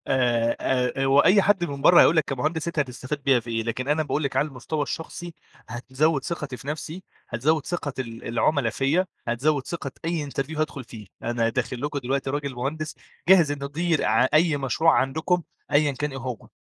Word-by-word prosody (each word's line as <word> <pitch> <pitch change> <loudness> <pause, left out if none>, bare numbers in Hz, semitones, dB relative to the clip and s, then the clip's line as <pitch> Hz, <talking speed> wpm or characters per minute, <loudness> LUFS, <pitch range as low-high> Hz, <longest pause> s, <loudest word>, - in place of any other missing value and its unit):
آآ، 120 -3 +2
آآ 130 +1 0
هو 135 +1 +5
أي 195 +7 +6
حد 195 -2 +2
من 140 -3 -6
برّه 175 - +8
هيقول 165 - +5
لك 155 - +5
كمهندس 155 +5 -2
أنت 170 -2 -2
هتستفاد 130 +1 -3
بيّا 135 -3 +4
في 120 +1 -10
إيه؟ 115 -1 -1
لكن 120 +3 -3
أنا 150 +2 +2
باقول 150 +1 -1
لِك 140 -2 -2
على 140 +3 +2
المستوى 145 +2 -3
الشخصي 170 +3 -6 0.3
هتزوِّد 130 +5 0
ثقتي 145 -6 -4
في 135 - -13
نفسي، 155 +4 -5 0.3
هتزوِّد 145 +6 +1
ثقة 165 -5 -3
ال 115 -3 -6
العُملا 120 +2 +1
فيَا، 140 +10 +1 0.2
هتزوِّد 135 +4 0
ثقة 155 -5 -4
أي 165 -4 -2
interview 140 +3 -4
هادخُل 155 -3 -2
فيه. 110 -4 -11 0.2
أنا 115 -1 0
داخل 120 +1 -3
لكم 145 0 -2
دلوقتي 135 +1 -2
راجل 140 0 -2
مهندس 150 +5 -3 0.3
جاهز 175 -6 +6
إنه 140 -1 -4
يدير 160 +3 0
ع 110 +4 +4
أي 155 -1 +4
مشروع 145 +4 +2
عندكم 160 +6 0 0.3
أيًا 145 0 +4
كان 145 +2 -3
إيه 135 - -6
هو. 125 -3 -6
140 Hz, 195 wpm, -25 LUFS, 125-155 Hz, 0.3 s, برّه